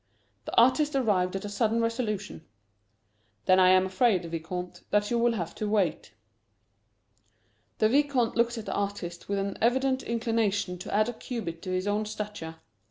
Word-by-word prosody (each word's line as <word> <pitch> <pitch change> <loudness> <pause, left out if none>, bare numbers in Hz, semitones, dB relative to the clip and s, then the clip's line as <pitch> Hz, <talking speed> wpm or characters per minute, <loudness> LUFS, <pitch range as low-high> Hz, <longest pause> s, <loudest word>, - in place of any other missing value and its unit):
The - - -6
artist 275 +5 +4
arrived 195 -8 +1
at 195 - -4
a - - -3
sudden 225 +2 +1
resolution. 225 -6 -2 1.0
"Then 185 0 +5
I 185 0 +6
am 185 0 +5
afraid, 190 -1 +2
Vicomte, 170 +2 -5
that 205 +1 +1
you 235 - +2
will 235 0 +3
have 170 -6 -4
to 215 - -3
wait." 195 -7 0 1.6
The 215 - +4
Vicomte 270 -1 +2
looked 235 0 +1
at 220 - -6
the - - -3
artist 195 -4 -4
with 200 - 0
an 195 0 -3
evident 260 +3 +2
inclination 225 -5 -1
to - - -7
add 215 +2 +3
a 240 - -3
cubit 220 -8 -6
to - - -6
his 185 +1 -1
own 205 +1 0
stature. 210 -6 -6
210 Hz, 165 wpm, -28 LUFS, 185-235 Hz, 1.6 s, I